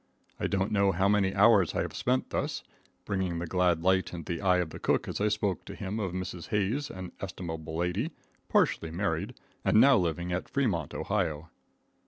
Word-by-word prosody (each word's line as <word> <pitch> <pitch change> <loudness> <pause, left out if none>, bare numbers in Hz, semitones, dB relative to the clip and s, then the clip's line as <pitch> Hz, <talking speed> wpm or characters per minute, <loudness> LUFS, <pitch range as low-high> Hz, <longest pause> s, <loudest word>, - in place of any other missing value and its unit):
I - - 0
don't 95 0 0
know 100 -1 +3
how 95 +2 +2
many 100 -2 +3
hours 100 -3 +5
I - - +1
have - - -5
thus 130 +1 0
spent, - - -7 0.4
bringing 95 -4 -1
the 85 - -3
glad 90 -1 +1
light 95 0 +2
into 85 0 -4
the 85 - -5
eye 90 -2 +4
of 90 -3 -1
the - - -8
cook - - +1
as - - -4
I 105 - +3
spoke 105 -4 -1
to - - -8
him 100 +3 -4
of 95 -4 -2
Mrs. 90 -1 -5
Hayes, 110 +8 0
an 95 -1 -7
estimable 80 -4 -5
lady, 90 - 0 0.4
partially 80 - +2
married, 85 -1 -2 0.3
and - - +4
now 135 +2 +7
living 85 0 -1
at 90 - -3
Fremont, 100 - -1
Ohio. 80 +1 -2
95 Hz, 195 wpm, -29 LUFS, 85-100 Hz, 0.4 s, now